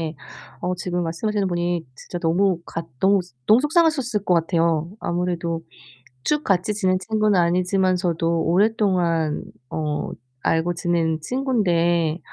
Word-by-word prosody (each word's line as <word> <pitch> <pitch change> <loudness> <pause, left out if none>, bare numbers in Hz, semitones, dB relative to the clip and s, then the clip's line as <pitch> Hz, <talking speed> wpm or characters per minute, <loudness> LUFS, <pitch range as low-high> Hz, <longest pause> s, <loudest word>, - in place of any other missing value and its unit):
예. 160 -1 -3 0.5
어 180 +1 0
지금 180 0 -2
말씀하시는 195 +5 -1
분이 175 -1 -1
진짜 175 - -7
너무 175 +2 +2
같 165 0 -5
너무, 195 +1 +4 0.3
너무 220 +3 +6
속상하셨을 295 - +2
것 185 - +2
같아요. 165 -1 +1
아무래도 170 -1 -2 0.6
쭉 300 0 +1
같이 195 +2 +1
지낸 190 -3 +1
친구는 215 -1 +1
아니지만서도 175 -1 +1
오랫동안 175 -4 +1 0.3
어 150 -2 -2 0.3
알고 165 +2 +1
지낸 170 -2 0
친구인데 175 - +1
175 Hz, 290 characters per minute, -22 LUFS, 165-200 Hz, 0.6 s, 너무